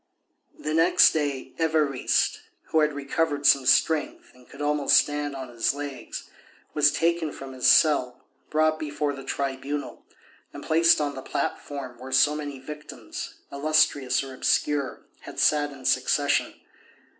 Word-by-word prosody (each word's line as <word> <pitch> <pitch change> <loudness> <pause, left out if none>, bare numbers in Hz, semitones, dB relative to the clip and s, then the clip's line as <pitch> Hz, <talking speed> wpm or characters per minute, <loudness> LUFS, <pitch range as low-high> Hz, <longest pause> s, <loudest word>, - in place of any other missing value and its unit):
The 155 - -4
next 175 +3 +5
day 145 -4 -3
Évariste, 155 -5 +1 0.3
who 160 - +2
had 150 0 +2
recovered 145 +1 -2
some 135 -3 +5
strength 155 +3 +1
and 125 0 -21
could 140 - -14
almost 145 -1 +3
stand 145 -1 0
on 130 -2 -7
his 120 +3 -1
legs, 145 -2 -7 0.5
was 150 -1 +4
taken 165 0 0
from 135 -1 -9
his 130 -1 0
cell, 130 -5 +3 0.2
brought 155 0 +1
before 145 -1 -2
the 135 -1 -9
Tribunal, 140 +2 -4 0.5
and - - -9
placed 165 +1 +4
on 145 -1 -1
the 130 - -7
platform 130 -3 -5
where 130 +1 -9
so 145 +3 +4
many 145 -2 -6
victims, 150 +3 -9 0.2
illustrious 140 -3 +1
or 135 -1 -9
obscure, 140 +1 0 0.2
had - - -12
sat 145 -1 +2
in 135 -2 -12
succession. - - +1
145 Hz, 145 wpm, -25 LUFS, 135-155 Hz, 0.5 s, next